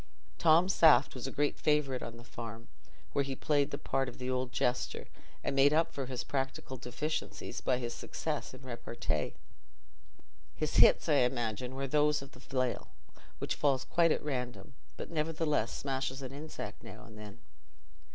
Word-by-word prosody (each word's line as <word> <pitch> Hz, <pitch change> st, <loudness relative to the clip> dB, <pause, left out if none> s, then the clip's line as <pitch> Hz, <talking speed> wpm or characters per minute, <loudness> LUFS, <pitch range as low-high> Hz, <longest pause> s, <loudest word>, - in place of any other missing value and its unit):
"Tom 170 Hz, +2 st, +6 dB
Saft" 165 Hz, -4 st, +6 dB
was 130 Hz, 0 st, -5 dB
a -, -, -4 dB
great 145 Hz, +2 st, 0 dB
favourite 150 Hz, -4 st, +2 dB
on 115 Hz, 0 st, -6 dB
the 120 Hz, -, -12 dB
farm, 115 Hz, -1 st, -8 dB, 0.4 s
where 140 Hz, -, +2 dB
he 135 Hz, -1 st, -3 dB
played 145 Hz, 0 st, +2 dB
the -, -, -3 dB
part 135 Hz, -1 st, -1 dB
of 120 Hz, -, -12 dB
the 125 Hz, 0 st, -2 dB
old 130 Hz, -1 st, -1 dB
jester, 125 Hz, 0 st, 0 dB, 0.4 s
and -, -, -1 dB
made 140 Hz, +2 st, +6 dB
up 165 Hz, +2 st, +2 dB
for 135 Hz, -2 st, -3 dB
his 125 Hz, -2 st, -3 dB
practical 135 Hz, 0 st, -3 dB
deficiencies 130 Hz, +6 st, -4 dB
by 125 Hz, -, +2 dB
his 120 Hz, -1 st, -3 dB
success 150 Hz, +5 st, -4 dB
in 130 Hz, -, -12 dB
repartee. 115 Hz, -, -3 dB, 1.2 s
His -, -, -1 dB
hits, -, -, +7 dB
I 150 Hz, -3 st, +4 dB
imagine, 125 Hz, -1 st, 0 dB
were 135 Hz, +1 st, -2 dB
those 150 Hz, +1 st, +2 dB
of 140 Hz, -, -12 dB
the 125 Hz, -, -15 dB
flail, 130 Hz, -2 st, -2 dB, 0.5 s
which -, -, -2 dB
falls 135 Hz, -3 st, +1 dB
quite 170 Hz, -1 st, +3 dB
at -, -, 0 dB
random, 130 Hz, 0 st, -4 dB, 0.2 s
but -, -, -6 dB
nevertheless 155 Hz, -6 st, 0 dB
smashes 135 Hz, 0 st, -3 dB
an 130 Hz, -, -5 dB
insect 150 Hz, +3 st, -7 dB
now -, -, -10 dB
and 110 Hz, -, -13 dB
then. 105 Hz, 0 st, -10 dB
135 Hz, 170 wpm, -32 LUFS, 125-150 Hz, 1.2 s, hits